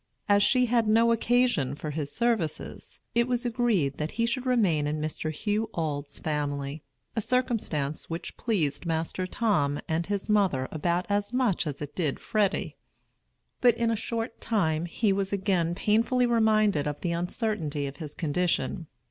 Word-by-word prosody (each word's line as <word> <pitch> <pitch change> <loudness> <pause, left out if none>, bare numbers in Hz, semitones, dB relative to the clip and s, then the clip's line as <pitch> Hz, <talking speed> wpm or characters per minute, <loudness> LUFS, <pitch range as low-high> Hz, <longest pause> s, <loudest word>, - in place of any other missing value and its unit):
As 205 -1 +5
she 250 +4 +4
had 235 -2 +2
no 230 +2 +5
occasion 230 - +2
for 150 +1 -5
his 145 -1 -3
services, 225 -9 -2
it 235 +1 +3
was 250 0 0
agreed 220 - +1
that 150 +1 -2
he 230 +1 +1
should 255 +2 -2
remain 185 -12 +2
in 150 +1 -1
Mr. 155 +1 -2
Hugh 210 +7 -1
Auld's 145 -3 -3
family; 145 -1 -2 0.3
a 225 - +1
circumstance 205 - -1
which 165 +1 -5
pleased 175 - -1
Master 165 +3 -1
Tom 150 -10 +1
and 165 +1 -1
his 200 -1 -2
mother 190 -12 +2
about 170 +3 0
as 205 +1 0
much 240 -10 +1
as 145 0 -4
it 145 0 -7
did 155 -6 -1
Freddy. 210 -3 0 0.8
But 245 -2 +5
in 230 -1 +1
a - - +1
short 225 +1 -4
time 165 -7 +1
he 200 +4 +1
was 195 0 -1
again 185 -4 +1
painfully 230 +6 +2
reminded 215 -9 +3
of 145 -1 -4
the 175 - -1
uncertainty 170 - -2
of 135 0 -6
his 150 -1 -7
condition. 170 0 -1
190 Hz, 165 wpm, -28 LUFS, 155-230 Hz, 0.8 s, As